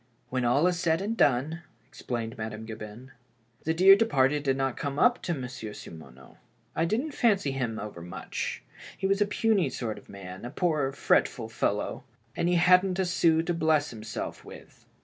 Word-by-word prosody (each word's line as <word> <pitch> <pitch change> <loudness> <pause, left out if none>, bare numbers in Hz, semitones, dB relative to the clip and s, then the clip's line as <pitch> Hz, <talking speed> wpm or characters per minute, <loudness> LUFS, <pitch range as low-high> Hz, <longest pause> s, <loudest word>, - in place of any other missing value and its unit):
When 130 -1 -1
all 135 +7 +3
is 180 -1 +1
said 165 -2 +2
and 210 +4 -2
done," 145 - +2 0.3
explained 120 -5 -5
Madame 110 0 -6
Gabin, 110 +3 -9 0.3
'' 120 0 -36
the 160 - +2
dear 190 +3 +8
departed 145 -9 +2
did 135 -2 0
not 135 -2 0
come 140 -1 -4
up 245 +8 +4
to 175 - -2
Monsieur 125 -5 -6
Simoneau, 65 -8 -12 0.4
I 165 - +2
didn't 240 - -1
fancy 205 - +2
him 125 -5 -2
over 105 -6 -7
much; 90 +1 -5 0.3
he 195 - -3
was 195 +1 +2
a 205 - +4
puny 205 -6 +2
sort 115 -4 -4
of - - -22
a - - -10
man, 95 -1 -9
a 120 - -5
poor, 150 -3 0
fretful 120 -4 +1
fellow 105 +3 -2 0.2
— 115 0 -38
and 170 - 0
he 180 - +3
hadn't 180 +2 +4
a 190 - +1
sou 165 -2 +3
to 175 - -1
bless 155 -3 +2
himself 110 -1 -6
with. - - -14
140 Hz, 190 wpm, -28 LUFS, 115-175 Hz, 0.4 s, dear